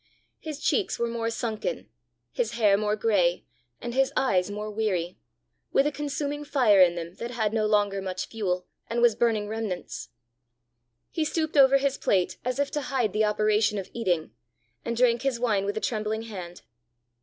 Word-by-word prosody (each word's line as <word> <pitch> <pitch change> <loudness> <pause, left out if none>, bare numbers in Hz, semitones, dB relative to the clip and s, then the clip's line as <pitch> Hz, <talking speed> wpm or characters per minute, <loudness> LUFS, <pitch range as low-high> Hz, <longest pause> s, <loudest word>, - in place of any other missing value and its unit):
His 305 -2 -6
cheeks 405 +4 0
were 235 - 0
more 230 -1 -2
sunken, 230 - -3 0.4
his - - -1
hair 210 -4 +4
more 210 +1 0
gray, 195 -6 +1 0.3
and 240 - -5
his 270 +1 +2
eyes 185 -8 +2
more 210 +1 -5
weary 190 -5 -2 0.5
with 275 - +3
a 295 - +1
consuming 290 0 -3
fire 250 -9 +4
in 175 -1 +5
them 170 0 -6
that 235 - -5
had 220 -3 -1
no 215 -1 +1
longer 205 -2 +2
much 185 -1 -3
fuel 185 -5 -2 0.2
and 235 +1 0
was 240 -2 +6
burning 220 -2 +1
remnants. 215 - -4 1.0
He 320 - 0
stooped 315 0 -1
over 275 -1 +7
his 275 0 -1
plate 185 -3 +1
as 250 +1 -2
if 285 0 0
to 295 - -1
hide 250 -7 0
the 215 0 +2
operation 210 0 +2
of 195 - -6
eating, 175 - -1 0.5
and 235 0 -3
drank 240 -1 +3
his 265 -3 -1
wine 215 -5 +1
with 205 +1 -2
a - - -1
trembling 220 -1 -2
hand. 180 -6 -8
220 Hz, 180 wpm, -27 LUFS, 205-250 Hz, 1.0 s, over